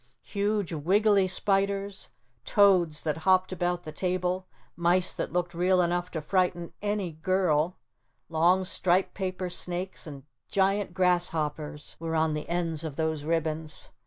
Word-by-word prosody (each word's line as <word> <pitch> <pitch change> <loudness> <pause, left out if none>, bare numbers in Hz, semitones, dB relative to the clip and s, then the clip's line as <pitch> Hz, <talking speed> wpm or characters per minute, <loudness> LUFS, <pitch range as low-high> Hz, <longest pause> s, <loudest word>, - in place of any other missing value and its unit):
Huge 205 -3 -1
wiggly 195 +5 +3
spiders, 195 +1 0 0.3
toads 180 -6 +4
that 155 -1 -1
hopped 185 +3 +3
about 175 -1 -1
the 155 - -7
table, 185 +1 -1 0.3
mice 175 +2 +2
that - - -4
looked 175 0 -1
real 180 +2 +2
enough 175 0 +1
to 160 - -4
frighten 175 0 0
any 205 -3 -1
girl, 170 0 +1 0.5
long 175 +4 +3
striped 185 +1 +1
paper 185 -1 -3
snakes 180 0 -5
and 140 -3 -9 0.2
giant 195 -1 +1
grasshoppers 160 -5 -1
were 165 0 -3
on 160 -1 +2
the 150 0 -5
ends 170 -2 -1
of 155 -4 -5
those 160 -1 -1
ribbons. 160 -1 -2
175 Hz, 135 wpm, -28 LUFS, 160-190 Hz, 0.5 s, toads